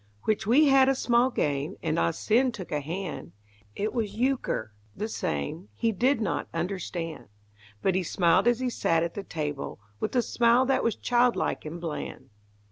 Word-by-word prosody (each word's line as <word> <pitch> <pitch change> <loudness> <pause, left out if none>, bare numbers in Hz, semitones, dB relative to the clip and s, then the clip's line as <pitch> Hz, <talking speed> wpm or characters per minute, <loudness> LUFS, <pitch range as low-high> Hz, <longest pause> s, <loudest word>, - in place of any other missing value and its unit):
Which 215 -2 0
we 275 +7 +6
had 270 -1 +6
a 270 - +3
small 240 0 +3
game, 145 - -1
And - - 0
Ah 85 0 +3
Sin 245 - +2
took 195 -7 -8
a 150 - 0
hand; 160 - -5 0.4
It 210 +2 -2
was 215 -4 -2
euchre 240 - -1 0.2
the 215 - -3
same 80 - -3
He 230 - +1
did 245 +5 +2
not 210 -6 -1
understand; 170 -2 -4 0.6
But 190 - +3
he 185 - +1
smiled 180 +3 +2
as 240 0 +3
he 255 - 0
sat 165 -7 +1
at 170 - -3
the 200 - -4
table 150 - -4 0.2
With - - -2
the 245 -2 +3
smile 240 +2 +3
that 270 0 +1
was 230 - +1
childlike 245 -6 +1
and 160 +3 -6
bland. 150 -5 -6
195 Hz, 180 wpm, -27 LUFS, 160-240 Hz, 0.6 s, we